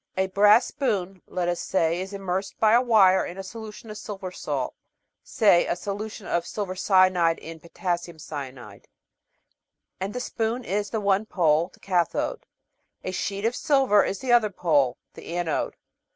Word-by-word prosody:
A 190 - +2
brass 205 +4 +5
spoon, 195 -8 -2
let 180 -1 -2
us 175 0 -1
say, 170 -1 0
is 190 +1 -6
immersed 195 -1 -4
by 220 0 +4
a 240 - +6
wire 205 -6 +5
in 175 - -7
a 195 - -5
solution 220 +1 -9
of - - -5
a 210 - -9
silver 195 -3 -6
salt - - -3 0.5
(say. 200 -6 +3
;i - - +1
solution 205 +3 -6
of 170 -1 0
silver 195 -3 -4
cyanide* 185 -3 +3
in 165 0 -9
potassium 170 0 -4
cyanide), 130 -9 -8 1.1
and 195 +3 -4
the - - -1
spoon 235 0 -2
is 205 0 -2
the 220 - -2
one 200 +1 +1
pole 165 -2 +2
the - - -21
cathode. 185 - -1 0.6
A 185 - -3
sheet 200 +2 -3
of 235 +2 +1
silver 270 -9 +3
is 195 - -2
the 255 +4 -2
other 230 -3 +5
pole 145 -9 +1 0.2
the 170 - -8
anode. 170 -3 -1
190 Hz, 170 wpm, -25 LUFS, 175-215 Hz, 1.1 s, a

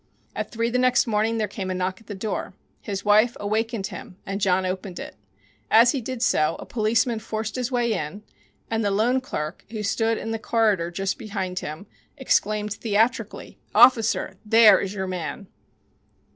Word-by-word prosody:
At - - -3
three 230 +1 -1
the 250 - +1
next 255 0 +3
morning 225 0 0
there 215 -1 0
came 195 -1 -5
a 185 - -2
knock 185 +2 -2
at - - -22
the 205 - -6
door. 210 +3 -4 0.3
His 200 -2 -5
wife 215 +3 +4
awakened 220 0 -1
him 185 - -8
and 195 +1 -4
John 190 -1 +2
opened 185 0 -4
it. - - -8 0.5
As 235 +2 +6
he 275 - -2
did 250 +1 -4
so 155 -8 +2
a - - -9
policeman 225 +1 +1
forced 220 0 -4
his 250 0 -2
way 240 -2 +1
in, 190 +3 -5 0.4
and 225 0 -1
the 205 - +1
loan 230 +6 +2
clerk, 155 -9 -5
who 215 -1 -5
stood 225 +2 +1
in 225 - -4
the 225 - -2
corridor 215 -7 +1
just 190 +6 -3
behind 195 -5 -4
him, 155 +6 -7 0.3
exclaimed 210 -5 0
theatrically, 225 +1 -1 0.2
"Officer, 230 -1 +4
there 225 0 +7
is 195 - -3
your 190 -1 -2
man!" 185 +2 -5
215 Hz, 180 wpm, -24 LUFS, 195-230 Hz, 0.5 s, there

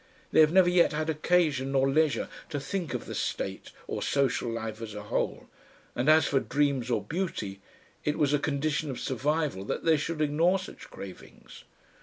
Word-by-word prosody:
They - - +4
have 155 -1 +7
never 185 0 +6
yet 175 -2 +4
had 155 +1 0
occasion 155 -4 +1
nor 135 0 +3
leisure 150 +1 +2 0.2
to 145 -3 -2
think 175 +3 -3
of - - -4
the - - -6
state - - -3 0.2
or - - -4
social 135 -3 +1
life 115 -1 -4
as 110 -2 -6
a 105 - -6
whole, 105 - -2 0.5
and 125 +5 +1
as 155 0 +6
for 135 - +2
dreams 140 -3 0
or 120 - 0
beauty, 130 - -4 0.4
it 150 - 0
was 145 -1 +2
a 145 - +3
condition 150 +1 -1
of 130 - -4
survival 145 -4 -1
that - - -3
they 160 -1 +5
should 155 +2 -3
ignore 155 +5 +3
such 185 - -10
cravings. 95 -2 -11
145 Hz, 185 wpm, -28 LUFS, 130-160 Hz, 0.5 s, have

